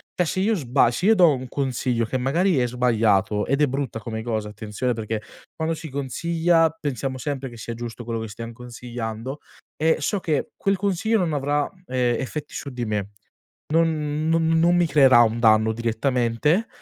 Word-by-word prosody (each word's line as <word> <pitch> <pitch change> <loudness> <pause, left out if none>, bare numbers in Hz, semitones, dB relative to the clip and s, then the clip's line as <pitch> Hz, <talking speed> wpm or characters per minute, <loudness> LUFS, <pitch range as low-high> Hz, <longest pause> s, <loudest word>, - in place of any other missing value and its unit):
cioè 180 - +1
se 185 - -2
io 215 +4 +2
sba 125 - +2
se 175 +10 -1
io 220 - +6
do 175 -6 +6
un 130 -1 -5
consiglio 125 -3 -1
che 130 +4 -2
magari 160 +5 +2
è 125 - +2
sbagliato, 110 -4 +1
ed 140 +2 +1
è - - +6
brutta 135 -3 -3
come 110 0 -5
cosa 110 -2 -3
attenzione, 105 +4 -3
perché 110 -1 -3 0.3
quando 160 +1 -1
si 160 0 -7
consiglia 165 +5 +1
pensiamo 135 -5 -4
sempre 135 -1 -4
che 120 - -12
sia 115 +1 -6
giusto 120 0 -7
quello 115 -1 -3
che 110 - -5
stiam 115 +2 -7
consigliando 120 +1 -6 0.4
e 160 +2 +2
so 200 +7 -1
che 155 -5 -1
quel 195 0 0
consiglio 200 +3 +1
non 175 -6 0
avrà, 145 +1 0 0.2
ehm, 125 -2 0
effetti 145 +2 -5
su 140 - -5
di 125 -2 -4
me, 105 -2 -2 0.6
non 155 -2 +1
non 165 0 +2
non 165 +2 +4
mi 175 0 +4
creerà 135 -5 +6
un 115 0 +2
danno 110 -1 +4
direttamente, 120 - 0
130 Hz, 185 wpm, -23 LUFS, 115-160 Hz, 0.6 s, io